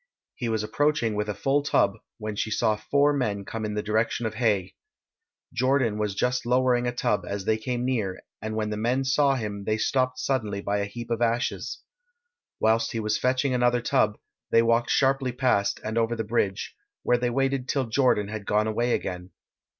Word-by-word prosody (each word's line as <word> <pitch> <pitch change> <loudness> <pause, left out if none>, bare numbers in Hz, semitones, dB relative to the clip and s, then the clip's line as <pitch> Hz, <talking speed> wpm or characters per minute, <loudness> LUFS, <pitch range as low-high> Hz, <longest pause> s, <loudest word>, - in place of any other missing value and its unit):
He 120 - -3
was 110 -1 0
approaching 120 +1 +1
with 105 0 -2
a 105 - -2
full 135 +8 +1
tub, 100 -8 +2 0.2
when 110 -2 -5
she 110 - -1
saw 110 0 +2
four 140 +7 +2
men 105 -8 -1
come 115 +2 -5
in 105 0 -3
the 105 - -1
direction 110 +2 0
of 110 - -2
Haigh. 105 -5 +1 0.8
Jordan 130 -4 +1
was 105 -2 -1
just 125 +3 0
lowering 125 0 +2
a - - +1
tub 105 -4 0
as 100 -1 -4
they 110 - +3
came 120 +2 -3
near, 110 -8 -1 0.2
and 110 +1 -4
when 110 -1 -1
the 105 - -2
men 120 +5 +1
saw 135 +1 +3
him 105 -4 -4
they 110 0 +1
stopped 130 +2 +1
suddenly 110 -8 -1
by 100 +1 -1
a 100 - 0
heap 120 +4 -8
of 115 0 -1
ashes. 120 0 -1 0.8
Whilst 115 +1 +2
he 115 - -1
was 110 0 0
fetching 130 +1 +1
another 125 0 +3
tub 110 -3 +1 0.3
they 115 - +5
walked 115 +1 +2
sharply 135 -1 +2
past 125 -5 +1
and 110 +1 -1
over 115 +1 +1
the 110 - -2
bridge, 105 -3 -1 0.3
where 120 0 +2
they 120 0 0
waited 135 +1 0
till 135 -2 +1
Jordan 115 -3 +2
had 105 -1 -6
gone 105 +1 +2
away 120 +2 0
again. 90 -1 -5
115 Hz, 195 wpm, -26 LUFS, 105-125 Hz, 0.8 s, they